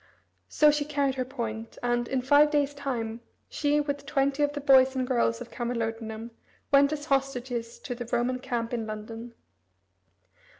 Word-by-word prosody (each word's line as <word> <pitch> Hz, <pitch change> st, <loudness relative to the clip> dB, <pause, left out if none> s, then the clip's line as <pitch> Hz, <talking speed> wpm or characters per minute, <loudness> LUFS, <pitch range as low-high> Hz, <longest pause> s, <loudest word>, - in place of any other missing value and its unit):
So 300 Hz, -1 st, +5 dB
she 295 Hz, 0 st, 0 dB
carried 285 Hz, -2 st, 0 dB
her 255 Hz, -1 st, -2 dB
point, 230 Hz, -4 st, -5 dB
and, 240 Hz, 0 st, +1 dB
in 260 Hz, -2 st, -1 dB
five 290 Hz, +3 st, +6 dB
days' 290 Hz, -1 st, +1 dB
time, 240 Hz, -5 st, -4 dB, 0.3 s
she, 295 Hz, 0 st, +1 dB
with 285 Hz, -1 st, -3 dB
twenty 275 Hz, 0 st, +1 dB
of 290 Hz, 0 st, +3 dB
the 290 Hz, -, -4 dB
boys 265 Hz, -2 st, +5 dB
and 260 Hz, -1 st, 0 dB
girls 240 Hz, -2 st, +1 dB
of 240 Hz, -, -8 dB
Camalodunum, 225 Hz, -1 st, -4 dB, 0.4 s
went 280 Hz, +1 st, +6 dB
as 295 Hz, -1 st, -4 dB
hostages 255 Hz, -4 st, -1 dB
to -, -, -4 dB
the 240 Hz, -1 st, -7 dB
Roman 245 Hz, +1 st, 0 dB
camp 235 Hz, -2 st, -3 dB
in 225 Hz, -2 st, -2 dB
London. 225 Hz, +2 st, -7 dB
255 Hz, 165 wpm, -28 LUFS, 235-280 Hz, 0.4 s, five